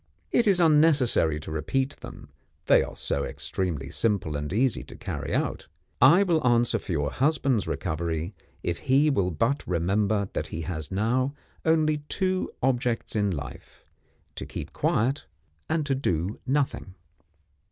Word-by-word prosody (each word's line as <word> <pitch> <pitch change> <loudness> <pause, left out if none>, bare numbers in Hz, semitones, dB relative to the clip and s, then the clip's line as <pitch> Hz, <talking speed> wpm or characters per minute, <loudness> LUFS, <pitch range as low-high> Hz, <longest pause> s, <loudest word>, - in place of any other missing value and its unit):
It 235 - +3
is 195 -3 +5
unnecessary 150 - +4
to 80 - -7
repeat 130 - -1
them, - - -11 0.4
they - - +6
are - - -5
so 70 - -1
extremely 80 -7 -3
simple 100 -9 0
and 75 +2 -3
easy 120 +4 +1
to - - -12
carry - - -5
out. - - -1 0.3
I 165 +10 +7
will 170 -5 +2
answer 120 -2 +3
for - - -7
your 75 -3 0
husband's 135 -5 +1
recovery 85 +1 -2 0.3
if 85 -1 -2
he 140 +3 +3
will 100 -9 +1
but 115 - 0
remember 100 +4 +1
that - - -2
he 80 - -5
has 80 -2 -4
now 125 +8 0 0.3
only 155 -2 +3
two 185 -1 0
objects 125 -3 0
in 105 -1 +2
life 70 -7 -7 0.5
to - - -5
keep - - -7
quiet, 130 +7 0 0.4
and 155 -1 0
to 140 - +1
do 95 - -1
Nothing." 130 -9 -1
115 Hz, 150 wpm, -26 LUFS, 85-140 Hz, 0.5 s, I